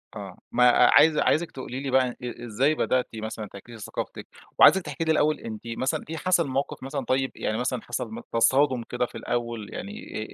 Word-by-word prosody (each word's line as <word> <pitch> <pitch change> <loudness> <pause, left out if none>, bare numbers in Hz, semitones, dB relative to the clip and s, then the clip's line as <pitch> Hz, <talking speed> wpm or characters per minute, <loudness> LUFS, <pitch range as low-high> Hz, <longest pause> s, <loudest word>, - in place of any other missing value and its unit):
آه، - - -8
ما 125 +1 +3
عايز 155 +4 +6
عايزِك 170 +2 +2
تقولي 130 -1 -6
لي 135 -1 -4
بقى 130 -1 +3
أ - - -8 0.3
إزاي 130 +8 +1
بدأتِ 130 -3 +1
مثلًا 110 -1 -5
تعكسي 115 +5 -12
ثقافتِك، 100 - -6 0.3
وعايزِك 190 - +8
تحكي 165 - -4
لي 160 - +1
الأول 155 0 +2
أنتِ 110 -2 -7
مثلًا 130 +3 -2
إيه 160 - -4
حصل 180 -2 +2
موقِف 135 0 -3
مثلًا 135 -1 -4
طيب 130 0 0
يعني 110 - -2
مثلًا 125 -1 -2
حصل 120 - -5
م 235 - -6
تصادم 130 +1 +3
كده 125 +1 -2
في - - -14
الأول، 115 -3 -4
يعني 205 - -7
130 Hz, 190 wpm, -26 LUFS, 120-150 Hz, 0.3 s, وعايزِك